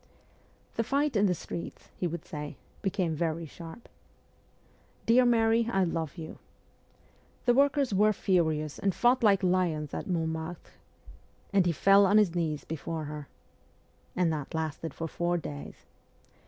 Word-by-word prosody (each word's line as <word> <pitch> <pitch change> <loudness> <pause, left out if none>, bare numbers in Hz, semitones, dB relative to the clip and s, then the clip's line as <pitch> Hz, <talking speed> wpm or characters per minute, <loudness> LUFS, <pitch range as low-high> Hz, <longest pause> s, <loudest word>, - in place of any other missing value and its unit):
' - - -34
The 230 - +2
fight 280 +2 0
in 205 0 +4
the 180 - +1
streets,' 170 - -7
he 180 - -1
would 170 -1 -5
say, 150 -1 -6
' - - -30
became 180 -3 0
very 165 +1 -1
sharp.'... 165 +8 -11 1.2
'Dear 245 +2 +5
Mary, 230 -1 +3
I 195 -4 +2
love 165 -2 -2
you.'... 160 -1 -8 0.5
' - - -33
The 245 - +5
workers 275 -2 +3
were 210 +2 +4
furious 160 -7 0
and 195 -2 0
fought 245 +1 +3
like 200 -4 +4
lions 175 -5 +1
at - - -4
Montmartre,'... 160 -1 -3 0.8
'and 195 -3 +4
he - - +3
fell 195 +4 +5
on 205 +3 +5
his 205 -6 +4
knees 160 -4 -2
before 160 0 -4
her,'... 150 -1 -7 0.9
'and 175 -3 +2
that 150 +2 -5
lasted 160 -1 -3
for 165 - -3
four 175 +2 -1
days. 75 - -8
175 Hz, 155 wpm, -29 LUFS, 160-205 Hz, 1.2 s, Dear